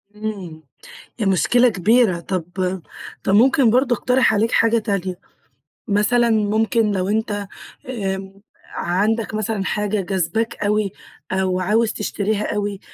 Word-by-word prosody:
امم 195 -7 -6 0.6
ده 215 - 0
مشكلة 240 +6 +3
كبيرة. 210 -1 +2
طب 180 0 -3 0.8
طب 195 - +1
ممكن 260 +3 +5
برضه 250 +2 +3
أقترح 250 0 +2
عليك 220 +2 +1
حاجة 230 0 +3
تانية، 195 -4 -2 0.7
مثلًا 235 +4 +2
ممكن 220 0 +2
لو 185 -2 -1
أنت 205 -1 -1 0.4
آمم 195 -4 -4 0.3
عندك 215 +5 0
مثلًا 215 -2 -2
حاجة 210 +1 -1
جاذباك 195 +4 -1
أوي، 205 -1 +1 0.4
أو 185 -1 0
عاوز 215 +4 +1
تشتريها 210 0 -2
أوي، 205 -1 -3
210 Hz, 120 wpm, -20 LUFS, 195-225 Hz, 0.8 s, ممكن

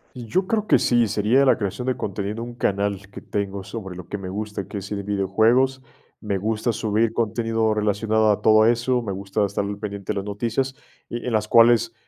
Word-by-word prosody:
Y 120 -2 -8
yo 185 - +1
creo 215 0 -1
que - - +5
sí, 120 -2 +2
sería 110 +6 +2
la 130 -4 +4
creación 105 +5 -3
de 130 - 0
contenido 105 +3 -4
un 120 0 -7
canal 100 -3 -1
que - - -9
tengo 100 -1 -4
sobre 95 -3 -7
lo 90 -1 -9
que 105 - -5
me 95 - -6
gusta, 105 0 -5
que 105 - -6
es 100 -1 -6
de 100 -1 -2
videojuegos, 110 +7 +2 0.4
me 100 -3 -1
gusta 110 +4 -1
subir 110 0 0
contenido 115 -1 0
relacionado 110 +1 +1
a 100 - 0
todo 110 0 +6
eso, 120 +2 +1
me 105 -4 -4
gusta 100 +2 -2
estar 100 0 -1
al 100 0 -5
pendiente 100 -2 -4
de - - -5
las 100 - -2
noticias, 120 +6 -2 0.3
y 120 - -5
en 125 - -2
las 105 -1 +1
cuales 115 0 +5
110 Hz, 215 wpm, -23 LUFS, 100-115 Hz, 0.4 s, todo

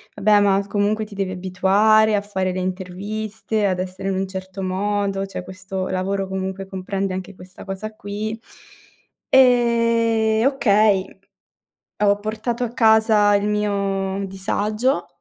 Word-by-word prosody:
"Vabbè, 210 -1 +4
ma 200 0 +2
comunque 210 +1 0
ti 205 -1 -12
devi 195 -1 -2
abituare 195 +4 +3
a 200 - +1
fare 190 -2 -2
le 185 - -3
interviste, 205 +4 -3
ad 185 -2 0
essere 185 +1 -4
in 195 - -1
un 190 +1 -1
certo 190 0 -7
modo, 195 +1 -1
cioè 195 -2 -7
questo 185 0 -5
lavoro 195 +1 -2
comunque 190 0 -4
comprende 190 0 -3
anche 185 +1 -6
questa 185 0 -13
cosa 210 +3 -6
qui". 215 +2 -5 0.9
Ehm, 230 -3 +3
okay, 210 -7 +3 1.0
ho 200 0 +3
portato 225 +3 -3
a 235 - -3
casa 220 -3 +4
il 200 0 +1
mio 200 -2 -1
disagio 215 +6 -1
200 Hz, 135 wpm, -21 LUFS, 190-215 Hz, 1.0 s, Vabbè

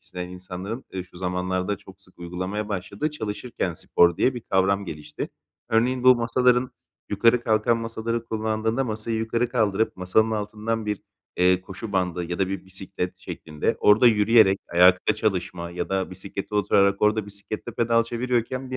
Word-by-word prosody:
isteyen 90 +1 -6
insanların, 95 +6 -7
eee, 95 - -3
şu 90 0 -18
zamanlarda 90 +2 -1
çok 95 -1 -16
sık 90 -2 -23
uygulamaya 95 +5 -4
başladığı 100 +9 -3
çalışırken 110 - -4
spor 85 +1 +3
diye 130 - +2
bir 120 - -5
kavram 100 0 +1
gelişti. 75 -3 -6 0.4
Örneğin, 125 +3 +1
bu 130 - +9
masaların, 125 +2 +2 0.4
yukarı 115 +4 +3
kalkan 110 +1 +2
masaları 115 0 -3
kullandığında, 110 +3 -1
masayı 110 0 -3
yukarı 115 +2 0
kaldırıp 110 -2 +1
masanın 100 +5 +2
altından 110 +1 -3
bir, 105 -2 -2 0.3
eee, 90 0 +4
koşu 100 +3 -8
bandı 90 -2 0
ya 85 +1 -4
da 95 -1 +1
bir 95 0 -4
bisiklet 95 -1 -4
şeklinde 75 -2 -3
orada 105 +4 +6
yürüyerek, 105 -2 +5
ayakta 90 +4 +5
çalışma 90 -5 -2
ya 90 0 -4
da 95 -1 -1
bisiklete 95 +2 -7
oturarak 100 -1 +3
orada 105 0 +2
bisikletle 100 +1 -7
pedal 115 0 +2
çeviriyorken 125 +2 -2
bir 130 - -2
105 Hz, 155 wpm, -24 LUFS, 90-115 Hz, 0.4 s, bu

